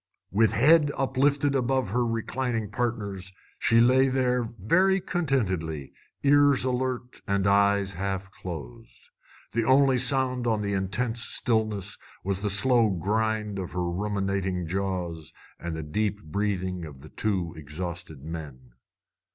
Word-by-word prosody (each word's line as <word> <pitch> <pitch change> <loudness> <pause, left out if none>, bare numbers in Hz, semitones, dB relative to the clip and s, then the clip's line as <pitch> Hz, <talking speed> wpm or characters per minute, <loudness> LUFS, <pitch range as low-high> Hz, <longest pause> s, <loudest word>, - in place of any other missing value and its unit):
With 110 +2 +3
head 150 +5 +5
uplifted 140 +2 +2
above 130 -4 0
her 125 +2 +1
reclining 115 -1 -2
partners, 100 -5 -3 0.3
she 115 - +4
lay 130 +3 +5
there 125 -2 +1
very 185 - +3
contentedly, 95 - -1 0.3
ears 145 -2 +5
alert 125 -1 -2
and 100 0 +1
eyes 100 0 +3
half 95 +1 -3
closed. 75 -11 -9 0.4
The 115 - 0
only 130 +1 +4
sound 130 -1 +1
on 110 -2 +1
the 100 0 -1
intense 115 +5 -1
stillness 110 -5 -1 0.2
was 95 0 -1
the 105 +1 -1
slow 115 +3 +5
grind 105 +2 -1
of 90 - -5
her 90 -1 -1
ruminating 95 -1 -1
jaws 90 -3 -3 0.3
and 85 -1 -4
the 80 - -4
deep 105 +7 -2
breathing 95 +1 -2
of 70 -4 -10
the 75 - -12
two 95 -6 -2
exhausted 80 0 -6
men. 75 -6 -8
105 Hz, 130 wpm, -27 LUFS, 90-125 Hz, 0.4 s, head